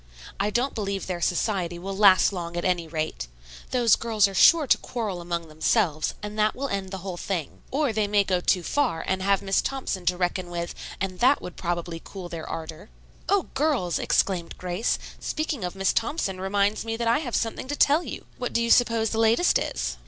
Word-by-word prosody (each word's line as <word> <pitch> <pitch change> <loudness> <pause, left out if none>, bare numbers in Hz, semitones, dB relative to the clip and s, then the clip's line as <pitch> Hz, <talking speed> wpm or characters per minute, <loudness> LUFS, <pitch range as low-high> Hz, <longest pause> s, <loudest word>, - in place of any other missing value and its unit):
I 205 - +1
don't 245 +6 0
believe 200 -2 -3
their 180 -2 -4
society 175 0 0
will 195 +3 -5
last 195 -1 +6
long, 170 -2 -5
at 175 - -2
any 175 -3 +1
rate. 155 - -3 0.4
Those 240 -4 +4
girls 220 -3 +2
are 195 - -7
sure 315 - +6
to - - +4
quarrel 210 -7 -4
among 170 -1 -3
themselves, 155 +1 0
and 210 +1 -5
that 215 0 +2
will 275 +2 -3
end 195 -2 -3
the 190 - -5
whole 185 -3 -4
thing. 175 -6 -4
Or 280 -3 0
they 215 -1 +1
may 205 0 +3
go 185 -2 0
too 180 0 +2
far 245 - 0
and 190 0 -1
have 195 0 +2
Miss 195 -1 +2
Thompson 200 -9 -3
to 180 0 +2
reckon 180 0 -1
with, 170 0 -4 0.3
and 185 -1 -3
that 260 +4 +5
would 180 - -8
probably 170 -1 -3
cool 185 -3 -8
their 165 -2 -6
ardor." 165 +4 -7 0.4
"O 400 -2 +3
girls!" 265 - +1
exclaimed 180 -4 0
Grace. 180 +5 -1 0.2
"Speaking 310 - -3
of 180 +1 -4
Miss 195 -1 +1
Thompson, 225 - -1
reminds 200 +2 +1
me 225 0 -3
that 235 0 -1
I 230 +4 +3
have 255 -7 -3
something 225 +2 -2
to 290 - -2
tell 295 +3 +4
you. - - -7
What 245 - -3
do 235 - +2
you 235 - +1
suppose 230 -3 +4
the 225 - -1
latest 225 +10 +4
is?" - - -3
195 Hz, 210 wpm, -25 LUFS, 175-230 Hz, 0.4 s, last